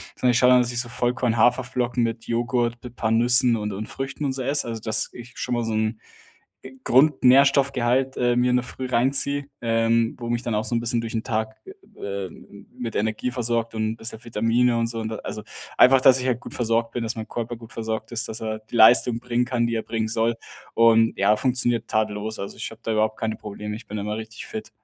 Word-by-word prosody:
Sondern 125 - +2
ich 120 - +2
schau 125 - +5
an, 125 0 +6
dass 120 -1 0
ich 120 - 0
so 120 - -8
Vollkorn, 120 -1 0
Haferflocken 125 +1 +1
mit 115 0 -3
Joghurt, 120 0 -1
mit 125 -1 -10
paar 110 -2 -1
Nüssen 120 +1 +5
und 105 -1 -3
und 105 +3 -5
Früchten 135 +2 -5
und 135 - -1
so 130 - -5
esse, 140 +1 -1
also 115 -1 -5
dass 110 0 -1
ich 120 0 -11
schon 125 - -3
mal 120 -1 0
so 115 -1 -2
'n 110 0 -1 0.6
G 130 - -10
Grundnährstoffgehalt, 135 -1 +3
äh, 120 -1 +2
mir 125 +1 +2
in 125 - +2
der 125 - -1
Früh 130 +1 -6
reinziehe, 135 +3 +1 0.2
ähm, 115 0 +1
wo 120 - -5
mich 120 0 -1
dann 115 -3 -2
auch 105 - 0
so - - -2
'n - - +2
bisschen 120 0 0
durch 115 -1 -6
'n 115 - -1
Tag, 110 -2 -2
äh, 385 - -10 0.6
ähm, 85 - -15
m 100 - -15
mit 115 -3 -5
Energie 110 +4 -1
versorgt 115 -2 -2
und 110 0 -1
bisschen 115 0 -8
Vitamine 115 +2 +1
und 115 0 0
so 115 0 -5
und 110 -1 -3
da 110 - -4
also 105 - -7 0.3
einfach, 130 +1 +6
dass 130 0 +6
ich 125 - -4
halt 125 -2 0
gut - - -10
versorgt 115 -1 0
bin, 120 - -3
dass 115 +1 -3
mein 110 -1 -6
Körper 120 +1 -4
gut 115 -1 -13
versorgt 110 0 -4
ist, 120 0 0
dass 110 - -6
er 110 -1 -3
die 110 +2 -11
Leistung 120 +1 +6
bringen 125 0 -1
kann, 120 -2 0
die 115 - -2
er 110 - -2
bringen 110 -1 -2
soll. 115 +1 0 0.4
Und 115 0 +4
ja, 100 +2 +4
funktioniert 120 -2 0
tadellos. 110 0 -2
Also, 100 - -6
ich - - -5
habe 115 0 -14
da 115 - -2
überhaupt 110 0 0
keine 110 -1 -2
Probleme, 105 0 -7
ich 110 - -10
bin 105 - -5
immer 105 +1 -3
richtig 110 0 -8
fit. 110 - -7
115 Hz, 240 wpm, -23 LUFS, 110-125 Hz, 0.6 s, an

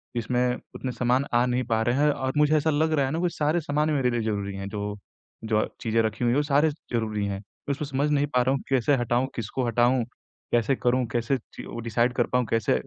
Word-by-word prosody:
इसमें 125 +1 +1 0.2
उतने 130 - -3
सामान 125 +3 +1
आ 120 +1 +4
नहीं 125 0 0
पा 115 -2 0
रहे 120 +2 +1
हैं 150 +2 +3
और 130 -2 -2
मुझे 150 +1 +4
ऐसा 155 +2 +1
लग 160 +1 +2
रहा 140 -3 +2
है 135 - -2
ना 160 - -1
वो 180 0 +1
सारे 155 +1 0
सामान 150 +1 0
मेरे 135 -4 +2
लिए 120 -1 0
ज़रूरी 100 -3 -2
हैं 100 0 -5
जो, 105 0 -4 0.5
जो 110 -1 +1
अ, - - 0
चीज़ें 115 0 +2
रखी 110 +2 -2
हुई 120 - +3
हैं 125 - +2
वो 145 - +3
सारे 145 +2 +3
ज़रूरी 110 -8 -3
हैं। 100 -1 -4 0.3
उसमें 145 +1 -1
समझ 140 +2 0
नहीं 145 0 +2
पा 125 -3 +2
रहा 125 +2 +2
हूँ 135 - -4
कैसे 135 +1 +3
हटाऊँ, 120 +1 +1
किसको 120 +3 -3
हटाऊँ, 120 +2 +3 0.5
कैसे 120 +3 +2
करूँ, 125 0 +1
कैसे 120 +3 0
चीज़ों 120 - -11
को - - -5
डिसाइड 120 +2 +1
कर 120 -1 +1
पाऊँ 125 -1 +3
कैसे 115 -3 +2
125 Hz, 240 wpm, -26 LUFS, 115-140 Hz, 0.5 s, आ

